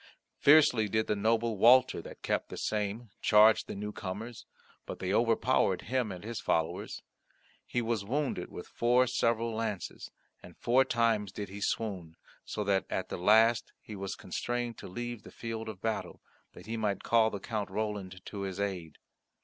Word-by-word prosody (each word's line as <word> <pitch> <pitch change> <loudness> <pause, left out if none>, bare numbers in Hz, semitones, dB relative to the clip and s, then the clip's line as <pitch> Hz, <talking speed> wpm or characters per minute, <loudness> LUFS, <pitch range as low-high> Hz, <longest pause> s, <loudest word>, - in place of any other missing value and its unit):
Fiercely 140 -8 +6
did 110 +2 +1
the 105 - 0
noble 110 +1 +1
Walter 125 +3 +6
that - - -12
kept - - -1
the - - -7
same 105 +1 -2
charge 105 +1 +6
the - - -6
newcomers, 105 +2 -6 0.4
but - - -5
they 95 +1 -2
overpowered 115 -4 +2
him 125 -4 -1
and 90 0 -8
his 115 +1 -5
followers. 80 -1 -1 0.6
He 120 - -1
was 115 -3 -1
wounded 130 -4 -2
with 90 - -8
four 125 +2 +3
several 115 -2 0
lances, 110 -5 -4 0.3
and - - -14
four 130 +3 +3
times 115 -5 +1
did 100 0 -6
he 100 +1 -8
swoon, 95 -7 -2 0.3
so 105 - -4
that 100 -1 +1
at 95 - -3
the - - -4
last 110 +5 +4
he 110 - -9
was 95 -1 -4
constrained 120 -1 -3
to - - -8
leave 120 +3 -5
the - - -12
field 115 -1 -5
of 100 -3 -9
battle, 110 -1 -3 0.3
that 90 - -13
he 115 +2 -4
might 105 -3 -1
call 115 -1 +4
the 100 - -5
Count 105 -1 -3
Roland 100 -4 -4
to 100 - -7
his 95 -1 -4
aid. 90 -6 -3
110 Hz, 175 wpm, -31 LUFS, 100-115 Hz, 0.6 s, Fiercely